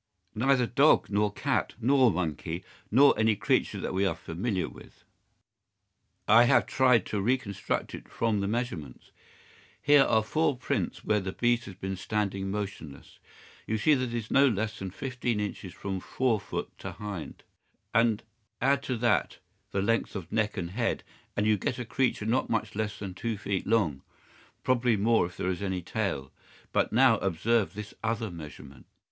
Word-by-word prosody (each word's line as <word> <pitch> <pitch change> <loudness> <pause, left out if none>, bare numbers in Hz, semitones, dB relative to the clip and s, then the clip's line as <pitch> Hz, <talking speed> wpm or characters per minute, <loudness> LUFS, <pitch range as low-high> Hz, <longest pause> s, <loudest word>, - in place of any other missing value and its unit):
"Neither 125 +2 +3
dog 140 -1 +4
nor 105 +1 +2
cat 130 +2 -1
nor 130 +1 +4
monkey 85 -1 -3 0.3
nor 135 +7 +6
any 110 -1 +3
creature - - 0
that - - -3
we 95 +1 +1
are 95 - +1
familiar 95 +3 -2
with. - - -14 1.2
I 115 +3 +7
have - - +4
tried 125 -5 +3
to 105 - -2
reconstruct 115 -3 -1
it - - -9
from 110 -3 0
the 100 - -1
measurements. 100 - -4 0.7
Here 145 0 +6
are 110 -4 +3
four 145 +4 +1
prints 125 - -2
where 105 - +2
the 95 -1 -4
beast 120 0 +1
has 95 - -9
been 95 +1 -4
standing 100 -1 -2
motionless. 95 -8 -6 0.5
You 110 - 0
see 150 +8 +4
that 130 -2 +1
it 120 -1 -5
is 115 -2 -4
no 140 +1 +6
less 110 -1 -1
than 95 - -4
fifteen 125 +1 -3
inches 105 -2 -4
from 95 0 -4
fore 120 +3 0
foot 100 - -5
to 95 - -6
hind. 100 -3 -7 0.5
Add 115 +4 0
to 130 -3 -3
that 120 +1 +1 0.3
the 95 - -1
length 115 +1 0
of 90 -5 -6
neck 110 -1 0
and 85 -2 -3
head, 115 +4 -1 0.3
and 105 - +2
you 105 -2 +3
get 120 - -2
a 125 - -4
creature 125 -2 0
not 120 +4 +1
much 110 -1 -1
less 105 0 -3
than 95 -3 -6
two 110 +4 -3
feet 100 -1 -3
long—probably 115 - -1
more 110 -2 +3
if 90 - -14
there 90 - -1
is 90 - -4
any 95 -3 -2
tail. 90 -9 -3 0.4
But - - +1
now 120 -1 +5
observe 100 +3 +1
this 105 0 -7
other 115 -2 -1
measurement. 75 -5 -11
110 Hz, 170 wpm, -28 LUFS, 95-120 Hz, 1.2 s, I